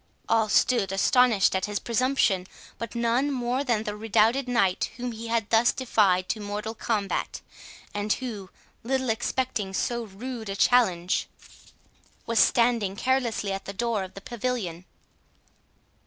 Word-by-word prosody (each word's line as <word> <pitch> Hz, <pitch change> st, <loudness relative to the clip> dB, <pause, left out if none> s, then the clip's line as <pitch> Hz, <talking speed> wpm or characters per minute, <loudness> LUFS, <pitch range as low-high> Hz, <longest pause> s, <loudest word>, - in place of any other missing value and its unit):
All 220 Hz, -1 st, +2 dB
stood 225 Hz, -2 st, +2 dB
astonished 230 Hz, +1 st, +3 dB
at 190 Hz, -, 0 dB
his 205 Hz, 0 st, -3 dB
presumption, 235 Hz, -6 st, +1 dB, 0.3 s
but 230 Hz, 0 st, -6 dB
none 235 Hz, +4 st, +1 dB
more 255 Hz, 0 st, -1 dB
than 235 Hz, -5 st, 0 dB
the 210 Hz, -1 st, -4 dB
redoubted 225 Hz, +4 st, +2 dB
Knight 195 Hz, -7 st, +1 dB
whom 245 Hz, 0 st, -3 dB
he 230 Hz, 0 st, -7 dB
had 230 Hz, -2 st, -1 dB
thus 230 Hz, +2 st, +5 dB
defied 200 Hz, -8 st, +2 dB
to 220 Hz, -, -1 dB
mortal 210 Hz, +2 st, -4 dB
combat, 215 Hz, -3 st, -2 dB, 0.5 s
and 205 Hz, +1 st, -2 dB
who, 215 Hz, -7 st, -6 dB, 0.3 s
little 260 Hz, 0 st, 0 dB
expecting 220 Hz, -4 st, -2 dB
so 235 Hz, +2 st, -1 dB
rude 220 Hz, +2 st, -7 dB
a 195 Hz, -, -3 dB
challenge, 190 Hz, -7 st, +2 dB, 1.0 s
was 230 Hz, -1 st, +1 dB
standing 230 Hz, -5 st, +3 dB
carelessly 240 Hz, -4 st, 0 dB
at 195 Hz, 0 st, -4 dB
the 200 Hz, -, -6 dB
door 230 Hz, -1 st, -1 dB
of 185 Hz, -, -10 dB
the 195 Hz, -, -8 dB
pavilion. 225 Hz, -8 st, -4 dB
225 Hz, 140 wpm, -26 LUFS, 200-245 Hz, 1.0 s, thus